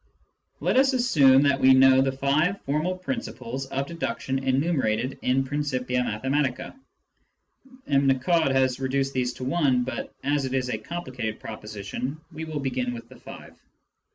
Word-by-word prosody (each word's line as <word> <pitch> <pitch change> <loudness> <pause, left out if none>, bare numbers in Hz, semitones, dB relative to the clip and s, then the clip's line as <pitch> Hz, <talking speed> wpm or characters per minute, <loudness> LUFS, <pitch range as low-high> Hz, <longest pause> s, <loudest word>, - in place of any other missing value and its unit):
Let - - +1
us 270 0 +4
assume 145 - +5
that 140 -1 +2
we 130 0 +6
know 130 0 +6
the 135 0 +1
five 145 +8 +1
formal 155 +6 -1
principles 135 - -5
of 135 +1 -2
deduction 135 -4 -3
enumerated 130 -3 0
in 130 +1 +2
Principia 130 -3 -1
Mathematica. 130 - -2 1.1
(M. 140 -1 +2
Nicod 140 +4 +2
has 130 -1 +1
reduced 135 +1 -1
these 125 -1 0
to - - -8
one, 135 -3 +2
but 125 -1 -5
as 145 0 0
it 130 0 -2
is 130 -1 -1
a - - -2
complicated 130 -10 -5
proposition, 110 +6 -6
we 160 0 -6
will 155 -2 -4
begin 130 -2 -2
with 115 0 -10
the 130 -2 -15
five.) - - -12
135 Hz, 155 wpm, -25 LUFS, 125-145 Hz, 1.1 s, we